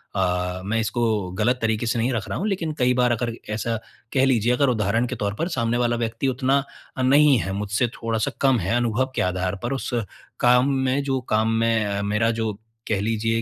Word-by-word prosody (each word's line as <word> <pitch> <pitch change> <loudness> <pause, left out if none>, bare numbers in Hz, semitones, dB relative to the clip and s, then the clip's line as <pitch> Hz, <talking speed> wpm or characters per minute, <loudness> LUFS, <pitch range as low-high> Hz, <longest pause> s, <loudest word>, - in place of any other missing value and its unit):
अ, 90 -1 -1
मैं 115 +3 0
इसको 110 -4 0
ग़लत 125 +4 +2
तरीके 110 0 0
से 115 0 0
नहीं 120 +3 +1
रख 115 - -3
रहा - - -2
हूँ 200 - -1
लेकिन 175 -6 -2
कई 125 0 +3
बार 125 -1 +2
अगर 120 0 -1 0.2
ऐसा 115 +1 -1 0.4
कह 135 -1 +4
लीजिए 120 -2 +2
अगर 140 +2 +2
उदाहरण 115 0 +1
के 130 - -4
तौर 100 -3 -2
पर 165 - 0
सामने 115 0 +1
वाला 120 -1 +1
व्यक्ति 115 +4 -3
उतना 135 +2 +1 0.3
अ, - - -1
नहीं 140 +2 +5
है, 95 +1 -3
मुझसे 105 +4 0
थोड़ा 115 -1 -3
सा 110 - 0
कम 135 -3 +4
है 95 +4 0
अनुभव 120 +2 0
के - - +1
आधार 90 +1 -2
पर 120 +3 -1
उस 135 - -3 0.5
काम 125 +2 +4
में 130 +1 +1
जो 135 -1 0
काम 110 +1 +3
में 110 -3 +1
मेरा 105 +3 +1
जो 110 -1 -1 0.3
कह 105 - 0
लीजिए 115 +1 0
115 Hz, 215 wpm, -23 LUFS, 105-130 Hz, 0.5 s, नहीं